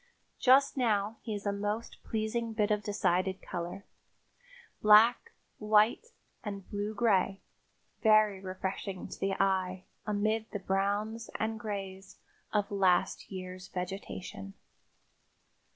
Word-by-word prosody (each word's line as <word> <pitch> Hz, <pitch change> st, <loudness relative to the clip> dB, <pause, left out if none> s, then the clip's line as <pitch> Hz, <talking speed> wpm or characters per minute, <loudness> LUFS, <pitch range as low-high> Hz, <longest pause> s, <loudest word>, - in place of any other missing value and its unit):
Just 275 Hz, +2 st, +5 dB
now 215 Hz, -3 st, +1 dB
he 220 Hz, -3 st, -4 dB
is 205 Hz, -, -7 dB
a 200 Hz, -, +2 dB
most 205 Hz, +3 st, -3 dB
pleasing 225 Hz, +1 st, -2 dB
bit 215 Hz, -1 st, +1 dB
of 210 Hz, 0 st, +2 dB
decided 190 Hz, -2 st, 0 dB
color, 175 Hz, +3 st, -6 dB, 1.0 s
black, 225 Hz, -, +6 dB, 0.3 s
white 215 Hz, -, +3 dB, 0.4 s
and 200 Hz, -3 st, -6 dB
blue 205 Hz, +1 st, -3 dB
gray, 195 Hz, -3 st, +2 dB, 0.6 s
very 215 Hz, -3 st, +5 dB
refreshing 190 Hz, 0 st, -4 dB
to -, -, -9 dB
the 195 Hz, 0 st, 0 dB
eye, 190 Hz, -1 st, 0 dB, 0.2 s
amid 215 Hz, +1 st, 0 dB
the -, -, -3 dB
browns 205 Hz, +4 st, -1 dB
and 220 Hz, 0 st, -2 dB
grays 195 Hz, -3 st, -6 dB, 0.3 s
of 205 Hz, -1 st, 0 dB
last 190 Hz, -2 st, +2 dB
year's 185 Hz, 0 st, -7 dB
vegetation. 195 Hz, +1 st, -6 dB
205 Hz, 115 wpm, -31 LUFS, 195-215 Hz, 1.0 s, black